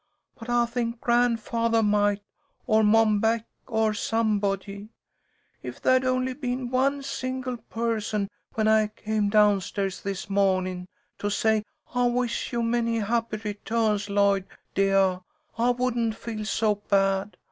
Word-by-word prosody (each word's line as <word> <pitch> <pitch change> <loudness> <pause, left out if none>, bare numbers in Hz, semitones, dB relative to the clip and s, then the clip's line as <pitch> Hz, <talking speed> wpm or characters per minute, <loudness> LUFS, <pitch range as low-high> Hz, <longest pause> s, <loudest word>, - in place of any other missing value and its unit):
But 230 +1 -10
I 240 0 +3
think 235 0 -3
grandfathah 230 -1 +1
might, 205 0 +2 0.4
or 220 -3 +3
Mom 215 0 +4
Beck, 225 +1 +1 0.2
or 220 -1 +1
somebody. 205 -2 -1 0.7
If - - -7
there'd 255 0 +3
only 255 0 0
been 250 -2 -3
one 275 +2 +1
single 255 -1 -4
person 225 -3 -2 0.3
when 220 -1 +1
I 220 -1 +4
came 215 -1 -2
down 205 -2 +4
stairs 195 0 -3
this 195 -1 -4
mawnin' 185 -2 0 0.3
to 205 - -1
say 220 +1 +1 0.3
'I 245 -1 +2
wish 245 -1 -1
you 235 -1 -1
many 230 0 0
happy 225 0 -1
returns, 210 0 -1
Lloyd, 200 -1 +2 0.3
deah,' 195 -1 +2 0.4
I 240 +2 +3
wouldn't 240 -2 0
feel 220 -2 -6
so 210 -1 0
bad. 195 0 +1
220 Hz, 135 wpm, -26 LUFS, 205-235 Hz, 0.7 s, Mom